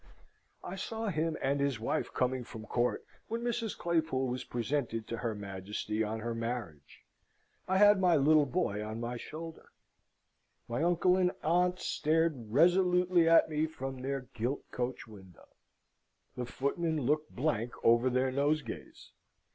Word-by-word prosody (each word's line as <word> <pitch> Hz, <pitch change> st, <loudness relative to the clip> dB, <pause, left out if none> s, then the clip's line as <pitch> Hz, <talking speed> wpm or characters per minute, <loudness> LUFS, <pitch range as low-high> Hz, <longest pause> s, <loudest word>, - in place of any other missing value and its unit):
I 195 Hz, -, -6 dB
saw 225 Hz, +3 st, -3 dB
him 160 Hz, -2 st, -1 dB
and 140 Hz, +1 st, +1 dB
his 140 Hz, -4 st, 0 dB
wife 110 Hz, -, -1 dB
coming 125 Hz, 0 st, 0 dB
from 110 Hz, -2 st, -9 dB
court, 120 Hz, +2 st, 0 dB, 0.2 s
when 230 Hz, +1 st, -3 dB
Mrs. 235 Hz, -2 st, -2 dB
Claypool 160 Hz, -6 st, 0 dB
was 125 Hz, 0 st, -3 dB
presented 120 Hz, -2 st, -2 dB
to 115 Hz, -, -4 dB
her 115 Hz, -2 st, -2 dB
Majesty 100 Hz, +2 st, -3 dB
on 110 Hz, +1 st, -3 dB
her 115 Hz, +1 st, -2 dB
marriage. 115 Hz, -, -5 dB, 0.7 s
I 190 Hz, -, +2 dB
had 205 Hz, 0 st, +7 dB
my 180 Hz, -3 st, +4 dB
little 150 Hz, +1 st, +5 dB
boy 115 Hz, -, -1 dB
on 110 Hz, +1 st, -5 dB
my 120 Hz, +1 st, -3 dB
shoulder. 160 Hz, +5 st, -8 dB, 1.0 s
My 120 Hz, +4 st, -2 dB
uncle 175 Hz, +2 st, +3 dB
and 180 Hz, -1 st, +3 dB
aunt 180 Hz, +3 st, +2 dB
stared 155 Hz, -11 st, 0 dB
resolutely 180 Hz, +2 st, +4 dB
at 165 Hz, -, +6 dB
me 155 Hz, 0 st, 0 dB
from 135 Hz, -4 st, -6 dB
their 135 Hz, +1 st, -2 dB
gilt 120 Hz, +5 st, -3 dB
coach 125 Hz, 0 st, -3 dB
window. 95 Hz, -5 st, -15 dB, 0.9 s
The 125 Hz, -1 st, -4 dB
footmen 155 Hz, +4 st, -1 dB
looked 150 Hz, +4 st, 0 dB
blank 120 Hz, -4 st, 0 dB
over 120 Hz, +2 st, +5 dB
their 130 Hz, +1 st, +1 dB
nosegays. 145 Hz, +3 st, -2 dB
140 Hz, 145 wpm, -32 LUFS, 120-165 Hz, 1.0 s, had